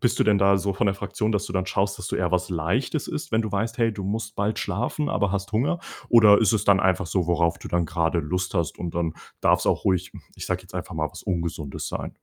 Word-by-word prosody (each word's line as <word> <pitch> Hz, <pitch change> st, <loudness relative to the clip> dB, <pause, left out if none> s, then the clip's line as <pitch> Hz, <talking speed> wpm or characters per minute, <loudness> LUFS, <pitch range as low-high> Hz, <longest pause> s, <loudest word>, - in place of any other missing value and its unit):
bist 120 Hz, -, +1 dB
du -, -, +4 dB
denn 105 Hz, -2 st, +4 dB
da 100 Hz, 0 st, +5 dB
so 100 Hz, +1 st, -1 dB
von 100 Hz, -, +1 dB
der 100 Hz, -, +1 dB
Fraktion, 105 Hz, +2 st, -2 dB
dass 105 Hz, -2 st, 0 dB
du -, -, -7 dB
dann 95 Hz, -1 st, -1 dB
schaust, 100 Hz, +2 st, 0 dB
dass 95 Hz, -, -5 dB
du -, -, -2 dB
eher 90 Hz, -1 st, 0 dB
was 90 Hz, 0 st, +1 dB
Leichtes 95 Hz, -, -1 dB
isst, 150 Hz, -, -5 dB
wenn 110 Hz, 0 st, +2 dB
du 110 Hz, -, -5 dB
weißt, 115 Hz, +5 st, -1 dB
hey, 115 Hz, -1 st, +2 dB
du 100 Hz, -2 st, -6 dB
musst 110 Hz, +3 st, -3 dB
bald 105 Hz, +1 st, -1 dB
schlafen, 125 Hz, -, -2 dB
aber 100 Hz, -, +1 dB
hast 100 Hz, +1 st, -3 dB
Hunger? 130 Hz, +11 st, +1 dB, 0.3 s
Oder 110 Hz, -4 st, +7 dB
ist 110 Hz, -4 st, +3 dB
es 105 Hz, -2 st, +1 dB
dann 100 Hz, -1 st, +5 dB
einfach 95 Hz, 0 st, +2 dB
so, 90 Hz, 0 st, 0 dB
worauf 85 Hz, -1 st, +2 dB
du -, -, -9 dB
dann 85 Hz, -1 st, +1 dB
gerade 85 Hz, -1 st, 0 dB
Lust 90 Hz, +4 st, -2 dB
hast 85 Hz, -3 st, -1 dB
und 85 Hz, -1 st, -5 dB
dann 85 Hz, -2 st, -1 dB, 0.3 s
darf's -, -, +3 dB
auch -, -, +1 dB
ruhig, 95 Hz, -1 st, +1 dB
hm, -, -, -11 dB
ich -, -, -7 dB
sag 90 Hz, 0 st, -2 dB
jetzt 95 Hz, 0 st, -17 dB
einfach 90 Hz, 0 st, -5 dB
mal, 75 Hz, 0 st, 0 dB
was -, -, -11 dB
Ungesundes 85 Hz, -5 st, -3 dB
sein? -, -, -4 dB
95 Hz, 270 wpm, -25 LUFS, 90-105 Hz, 0.3 s, Oder